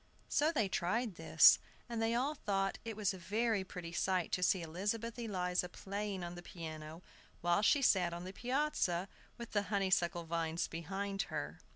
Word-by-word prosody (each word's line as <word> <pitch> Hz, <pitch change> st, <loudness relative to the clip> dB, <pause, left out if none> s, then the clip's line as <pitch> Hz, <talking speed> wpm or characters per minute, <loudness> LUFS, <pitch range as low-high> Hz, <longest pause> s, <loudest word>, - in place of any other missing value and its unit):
So 305 Hz, +2 st, +3 dB
they 220 Hz, -11 st, +1 dB
tried 205 Hz, +5 st, 0 dB
this; 175 Hz, -, +7 dB, 0.3 s
and 235 Hz, -2 st, -3 dB
they 225 Hz, +1 st, +1 dB
all 270 Hz, +5 st, +1 dB
thought 195 Hz, -8 st, -1 dB
it 225 Hz, -2 st, -5 dB
was 205 Hz, -2 st, +1 dB
a 190 Hz, -, -8 dB
very 215 Hz, +2 st, 0 dB
pretty 175 Hz, -2 st, -7 dB
sight 185 Hz, 0 st, 0 dB
to 180 Hz, -, 0 dB
see 180 Hz, -1 st, +3 dB
Elizabeth 210 Hz, +8 st, -3 dB
Eliza 180 Hz, -5 st, -1 dB
playing 200 Hz, 0 st, -4 dB
on 175 Hz, 0 st, -5 dB
the 175 Hz, -, -8 dB
piano, 160 Hz, -1 st, -8 dB, 0.4 s
while 175 Hz, +3 st, +3 dB
she 275 Hz, +6 st, +4 dB
sat 180 Hz, -7 st, +4 dB
on 170 Hz, +1 st, -5 dB
the 185 Hz, +1 st, -7 dB
piazza, 245 Hz, -, 0 dB, 0.3 s
with 235 Hz, -1 st, -8 dB
the 205 Hz, -, +2 dB
honeysuckle 190 Hz, -4 st, +1 dB
vines 165 Hz, 0 st, -1 dB
behind 195 Hz, +4 st, -3 dB
her. -, -, -4 dB
195 Hz, 175 wpm, -35 LUFS, 175-220 Hz, 0.4 s, this